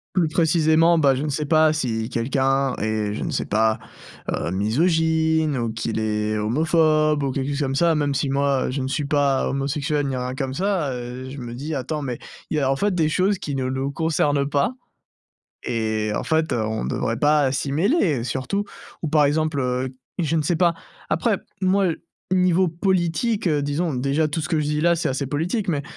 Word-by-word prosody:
Plus 170 -4 +2
précisément, 165 +1 +3
bah, 140 -4 +4
je 130 - -2
ne - - -2
sais 150 +2 -2
pas 155 0 +4
si 115 -7 -2
quelqu'un 135 +2 0
est 110 -1 -1
je - - -5
ne - - -3
sais - - -1
pas, 110 +1 +1 0.5
heu, - - -2
misogyne 160 - +1
ou 115 -2 -2
qu'il 115 0 -3
est 105 0 -1
homophobe 155 +5 +2
ou 135 - 0
quelque 135 +1 -2
chose 140 - -2
comme 135 -2 -1
ça, 165 +3 +3
même 145 -2 0
si 140 +1 -1
moi 140 -1 +1
je 135 +1 -2
ne 130 - -2
suis 145 +2 -1
pas 140 -2 +1
homosexuel 145 +1 -1
ni 135 - -2
rien 125 0 -3
comme 135 0 -3
ça, 180 -5 0
heu, 125 +1 -6
je 140 - -8
me 120 -1 -6
dis: 150 +5 -4
«Attends 150 +3 -3
mais 125 -4 -3 0.3
il - - -2
y 150 - +1
a 135 -1 +2
en 135 - 0
fait 205 +4 0
des 160 -3 +2
choses 190 +5 +1
qui 145 - -4
ne 130 -1 -1
nous 130 +2 -2
concernent 145 -2 +1
pas 140 +9 +1 0.9
et 110 -2 -1
en - - -1
fait, 160 0 0
heu, 110 - 0
on 110 0 -2
ne - - -2
devrait 115 -2 -1
pas, 150 0 +3
heu, - - -2
s'y 135 +1 -2
mêler, 170 - +2
heu, - - -4
surtout». 130 - -2 0.4
Ou 160 - -1
par 150 -1 +4
exemple, 155 0 +1
heu, 125 0 -1 0.3
je 165 -1 0
ne 155 - +2
sais 165 +3 0
pas 170 0 +3 0.4
après - - +1 0.2
moi 190 0 +2 0.4
niveau 185 0 +3
politique, 185 +5 0
heu, 150 -3 +1
disons 145 +2 -1
déjà 140 +5 +1
tout 155 +2 -2
ce 155 - -4
que 160 - +1
je - - -1
dis 150 +1 -1
là 170 +1 +4
c'est 165 - -1
assez 135 +1 -2
politique 175 - -2
mais 145 -5 0
145 Hz, 215 wpm, -23 LUFS, 130-160 Hz, 0.9 s, bah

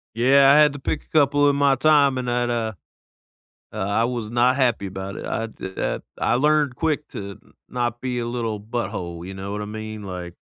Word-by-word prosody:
Yeah, 135 +3 +6
I - - +6
had 150 -1 +6
to 145 - -7
pick 150 +3 -3
a - - -32
couple 145 -1 +4
in 140 - +1
my 140 -1 +4
time, 140 -1 +4
and 125 -1 -2
I'd, 120 0 0
uh 115 -2 -1 1.0
Uh, - - -7
I 105 +3 +1
was 120 -3 -2
not 125 +3 +2
happy 120 -7 +1
about 95 +1 -6
it, - - -6
I 115 - -2
did 95 -3 -9
that - - -2 0.2
I 115 - +1
learned 150 0 +2
quick 150 -1 -1
to 100 -1 -7 0.3
not 120 -1 -2
be 125 -1 -2
a 120 - -2
little 115 -3 -3
butthole, 95 -7 -5
you 95 - -7
know 95 +1 -6
what 105 - -4
I - - -4
mean? 110 0 -7
Like 90 -2 -7
120 Hz, 215 wpm, -23 LUFS, 105-140 Hz, 1.0 s, Yeah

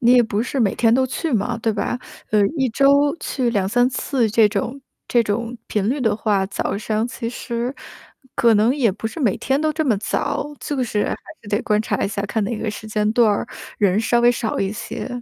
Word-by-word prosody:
你 245 -1 +5
也 250 -1 +7
不 215 -1 -1
是 265 +3 -3
每 215 -6 +2
天 225 -2 +3
都 260 +1 +3
去 315 +5 -3
嘛， 230 +2 0
对 225 -1 0
吧？ 210 +4 -2 0.3
呃， 210 -1 +4
1 265 -3 +2
周 280 +4 +4
去 250 -4 -1
2-3 230 +4 +2
次 255 -2 0
这 215 0 +5
种 230 +6 -3 0.3
这 240 - +4
种 230 +3 -2
频 210 -1 -1
率 275 +4 0
的 220 -4 +2
话， 205 -3 +1
早 195 0 -2
上 215 +2 -1
其 240 -1 -5
实 240 0 -3 0.6
可 230 -2 +4
能 220 +5 +3
也 255 -7 +2
不 210 +3 -5
是 225 +9 -6
每 225 -9 +2
天 270 +2 0
都 310 0 +1
这 315 0 -1
么 240 -7 +2
早， 215 - -1 0.2
就 280 -3 -2
是 215 -4 0
还 - - -2 0.3
是 205 - -12
得 205 +1 +1
观 210 0 +2
察 215 -2 -1
一 - - 0
下， 200 - -3
看 210 +2 -1
哪 230 +3 -2
个 220 - -3
时 210 +1 -8
间 210 0 0
段 230 -1 +4
儿， 205 - -2 0.3
人 200 0 +3
稍 235 +1 +2
微 240 0 +6
少 230 -2 -2
一 195 0 0
些。 215 - -5
230 Hz, 235 characters per minute, -21 LUFS, 210-250 Hz, 0.6 s, 也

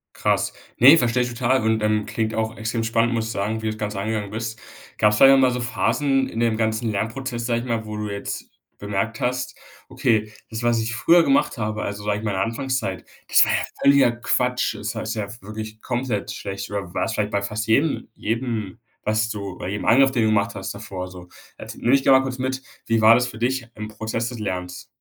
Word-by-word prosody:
Krass. - - 0 0.3
Ne, 140 +7 +9
verstehe 125 -2 +2
ich 125 - -3
total 125 +1 +1
und, 110 -1 +1
ähm, 105 0 +1
klingt 110 0 -2
auch 110 0 -2
extrem 115 +1 -2
spannend, 115 +1 +1
muss 115 -1 0
ich - - -4
sagen, 110 +2 -2
wie 110 - -3
du 110 - 0
das - - -11
Ganze 105 -2 -3
angegangen 105 -1 -2
bist. 115 0 -4 0.4
Gab's 105 0 +3
vielleicht 135 +3 +8
auch - - +4
mal 130 -1 +4
so 125 - -2
Phasen 135 +3 +1
in 115 - -5
dem 115 -2 +2
ganzen 110 +1 0
Lernprozess, 120 +3 -3
sage 120 -1 +1
ich - - -7
mal, 115 -2 -1
wo 105 0 -6
du 105 -1 -3
jetzt 100 0 -5 0.3
bemerkt 105 +2 -2
hast: 125 0 -1 0.3
„Okay, 115 -5 +1 0.2
das, 115 +1 -5
was 120 -1 +2
ich 115 +1 -2
früher 165 +8 +5
gemacht 275 - +2
habe, 105 -1 -2
also, 100 0 -4
sage 105 0 0
ich 110 - -9
mal 105 - 0
in 95 - -2
Anfangszeit, 115 -1 -2 0.2
das - - +6
war - - 0
ja - - +2 0.2
völliger 140 -3 +5
Quatsch.“ 125 0 0
Das 105 +1 -4
heißt 110 +1 -3
ja 105 -2 -3
wirklich 110 +1 -8
komplett 120 -4 -2
schlecht, 100 0 -6
oder 100 -4 -4
war's 115 - -1
vielleicht 105 -2 -1
bei 100 - 0
fast 105 +2 -3
jedem 140 +7 +2
jedem 115 -3 -3 0.2
was 110 +1 +1
du 100 -4 -5
bei - - -5
jedem 100 +1 -4
Angriff, 135 +3 +5
den 120 -4 +1
du - - +3
gemacht 100 -2 +1
hast, 95 0 -5
davor 100 -3 -6
so, 90 -1 -12 0.3
et - - -8
nehme 120 - +1
mich 135 0 +4
mal 130 0 +6
kurz 130 -1 -4
mit, 130 +1 -2 0.3
wie 115 -1 +2
war 110 +1 +8
das 125 +1 +2
für 110 - -10
dich 125 +1 -1
im 105 0 -6
Prozess 110 +2 -3
des 120 -1 -6
Lernens? 90 -3 -4
110 Hz, 230 wpm, -23 LUFS, 105-125 Hz, 0.4 s, Ne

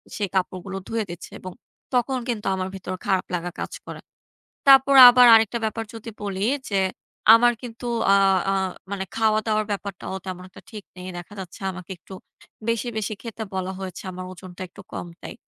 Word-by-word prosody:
সেই 205 -2 -1
কাপড়গুলো 190 +1 -2
ধুয়ে 225 -1 -1
দিচ্ছে 175 - -9
এবং 185 - -8 0.4
তখন 250 +1 +1
কিন্তু 220 -3 -3
আমার 185 0 -2
ভেতর 185 -1 -5
খারাপ 190 -1 +1
লাগা 175 0 -4
কাজ - - -4
করে। - - -8 0.7
তারপর 275 0 +7
আবার 250 0 +7
আরেকটা 225 +1 +4
ব্যাপার 225 +1 -2
যদি 225 +1 -8
বলি 195 -1 -3 0.3
যে, 195 - +1 0.6
আমার 240 +1 +5
কিন্তু 240 0 -8 0.3
আ - - +7 0.4
আ - - +2 0.4
মানে 195 -1 -3
খাওয়া 220 -1 +2
দাওয়ার 215 -1 +1
ব্যাপারটাও 195 -1 -5
তেমন 180 -1 -5
একটা - - -14
ঠিক 210 -3 -9
নেই। 180 0 -8
দেখা 175 +4 -10
যাচ্ছে 180 +1 -10
আমাকে 185 0 -10
একটু 190 - -15 0.6
বেশি, 230 +1 0
বেশি 215 0 -2
খেতে 230 -1 -6
বলা 185 0 -2
হয়েছে 190 -1 -7
আমার 185 0 -7
ওজনটা 185 0 -10
একটু 200 +2 -13
কম - - -5
তাই। - - -8
200 Hz, 180 wpm, -24 LUFS, 185-225 Hz, 0.7 s, তারপর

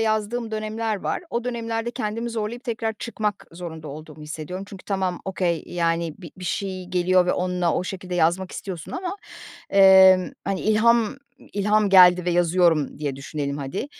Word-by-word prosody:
yazdığım 220 +1 -1
dönemler 215 0 -2
var. 200 - -3
O 235 0 -2
dönemlerde 230 -1 -3
kendimi 230 -1 -3
zorlayıp 230 +2 -4
tekrar 225 -2 -2
çıkmak 210 -4 -3
zorunda 165 -3 -8
olduğumu 155 +1 -10
hissediyorum. 155 +5 -6
Çünkü 195 -2 -11
tamam, 190 -3 -2
okay, 180 -3 -1
yani, 165 -2 -1
bi 170 -4 -10
bir 185 - -9
şey 185 0 -3
geliyor 180 0 +2
ve - - +2
onunla 180 -2 0
o 180 - -1
şekilde 185 -1 -5
yazmak 175 +2 +1
istiyorsun 175 -5 -7
ama, 365 +1 -4 0.5
emm, 190 -1 +7
hani, 195 -1 -2
ilham 220 +2 +3 0.4
ilham 210 +1 +2
geldi 180 -2 +7
ve 180 - +1
yazıyorum 170 -4 +2
diye 145 -3 -3
düşünelim 140 +1 -4
hadi, 145 - -4
190 Hz, 160 wpm, -23 LUFS, 175-215 Hz, 0.5 s, emm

